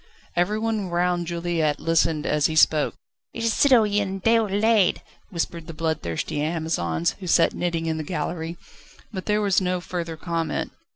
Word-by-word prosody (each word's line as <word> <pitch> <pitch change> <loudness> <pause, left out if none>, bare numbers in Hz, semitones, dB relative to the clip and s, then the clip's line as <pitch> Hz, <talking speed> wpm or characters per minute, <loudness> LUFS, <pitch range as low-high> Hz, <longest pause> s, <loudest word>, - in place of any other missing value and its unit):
Everyone 210 +2 0
round 175 0 0
Juliette 170 -3 -1
listened 165 -2 +1
as 150 -1 +2
he 160 - -4
spoke: 155 -1 +4 0.4
"It 230 - -4
is 230 -1 +2
Citoyen 210 -7 +3
Déroulède!" 220 -1 +3 0.3
whispered 170 -3 -4
the 165 - -8
bloodthirsty 150 - -2
Amazons, 150 - -1
who 185 - -7
sat 165 0 +4
knitting 170 -2 -2
in 160 -1 -1
the 155 - -3
gallery. 165 +1 -4 0.6
But 190 -2 -6
there 210 0 +2
was 200 -2 +2
no 180 0 0
further 170 -2 -5
comment. 165 0 -2
170 Hz, 150 wpm, -24 LUFS, 160-195 Hz, 0.6 s, spoke